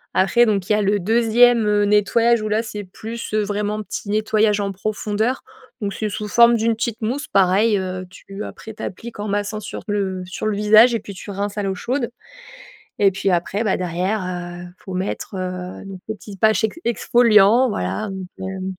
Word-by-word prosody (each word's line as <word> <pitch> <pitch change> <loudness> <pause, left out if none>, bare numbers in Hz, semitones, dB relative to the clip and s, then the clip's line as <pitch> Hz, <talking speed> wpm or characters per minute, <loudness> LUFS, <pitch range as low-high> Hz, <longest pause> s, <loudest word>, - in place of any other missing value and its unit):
Après 235 +6 +4
donc 200 -4 0
il - - +4
y - - +4
a 210 - +1
le 205 +1 +2
2e, 230 +3 +4
heu, 210 0 +3
nettoyage 220 +3 +3
où 215 - -3
là, 215 +2 +1
c'est 210 -2 -6
plus, 225 +5 -7
heu, 215 0 +2
vraiment 210 +1 -2
petit 205 - -6
nettoyage 215 0 +2
en 200 -1 -2
profondeur, 215 +4 -2 0.4
donc 200 -1 -2
c'est 215 +1 -3
sous 210 +1 -4
forme 235 +2 +6
d'une 225 +1 +1
petite 230 0 -3
mousse 255 +7 -2
pareil, 200 +3 +3
heu, 185 -1 -4
tu 195 +2 -9
après 220 - -9
tu 215 - -12
appliques 225 +4 -7
en 210 - -3
massant 205 +1 -2
sur 215 - -7
le 195 -3 -2
sur 185 +4 -4
le 215 - 0
visage 215 +3 +6
et - - 0
puis 200 - -9
tu 190 - -10
rinces 200 +1 -4
à - - -1
l'eau 195 -1 -1
chaude 245 +5 -2 0.9
et 200 -1 +5
puis 195 +1 -1
après, 185 +5 0
bah, 205 - +1
derrière, 185 +4 -1
heu, 175 -1 -6
faut 190 - -8
mettre, 190 +2 -4
heu, 185 0 -5
le 195 -1 -8 0.2
petit 205 -1 -11
patch 220 +3 +3
ex 220 +9 -1
exfoliant, 235 0 +4
voilà 215 0 -2
donc 190 -1 -6 0.2
heu, 190 -1 -5
210 Hz, 200 wpm, -21 LUFS, 195-220 Hz, 0.9 s, forme